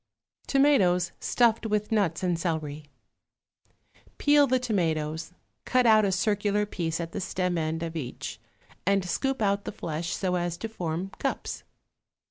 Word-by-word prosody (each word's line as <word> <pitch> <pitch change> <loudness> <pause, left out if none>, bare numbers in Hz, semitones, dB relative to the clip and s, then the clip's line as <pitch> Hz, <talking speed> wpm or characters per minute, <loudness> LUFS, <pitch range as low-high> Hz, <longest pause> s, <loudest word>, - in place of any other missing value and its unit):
=Tomatoes 200 -12 +3
Stuffed 230 -2 +2
with 210 0 -1
Nuts 190 -6 +1
and 175 -2 +1
Celery.= 155 -3 -3 1.3
Peel 290 -1 +5
the 260 0 +3
tomatoes; 165 -9 -1 0.3
cut 255 -1 +2
out 215 -2 +6
a 195 - +1
circular 205 +2 +1
piece 165 -5 -3
at 165 -1 -4
the - - -4
stem 180 -1 -1
end 160 0 -1
of 165 0 -5
each 130 -6 -5 0.4
and 195 0 +2
scoop 270 +5 -1
out 200 0 +1
the - - -4
flesh 165 -3 -4
so 185 -2 -1
as 175 -1 -1
to 225 - -4
form 180 -3 -4
cups. - - -3
185 Hz, 145 wpm, -27 LUFS, 165-215 Hz, 1.3 s, out